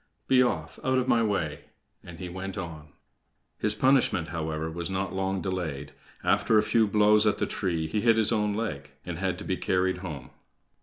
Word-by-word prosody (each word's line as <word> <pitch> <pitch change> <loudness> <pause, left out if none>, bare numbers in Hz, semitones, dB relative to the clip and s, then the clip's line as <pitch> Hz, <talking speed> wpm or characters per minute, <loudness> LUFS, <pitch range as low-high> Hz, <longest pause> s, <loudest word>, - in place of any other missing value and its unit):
Be 130 -1 +5
off 80 -11 -1
out 130 0 +2
of 130 0 0
my 115 - +4
way!" 100 -9 -1 0.4
and 85 -1 -10
he 90 - -6
went 95 +2 -6
on. 85 -5 -6 0.7
His 105 0 +3
punishment, 130 -9 +2
however, 80 -1 -3
was 85 0 -4
not 95 +1 -2
long 95 0 -1
delayed. 80 -7 -3 0.3
After 110 - +3
a 105 - +4
few 110 0 +3
blows 105 +1 +4
at 105 - +2
the - - 0
tree, 85 -4 -2
he 105 +7 -1
hit 115 0 +4
his 110 0 +3
own 105 -2 +1
leg, 115 +1 -4 0.2
and 85 -2 -5
had 95 -2 -1
to - - -7
be 95 - -1
carried 95 0 0
home. 75 -9 -7
95 Hz, 195 wpm, -27 LUFS, 85-105 Hz, 0.7 s, Be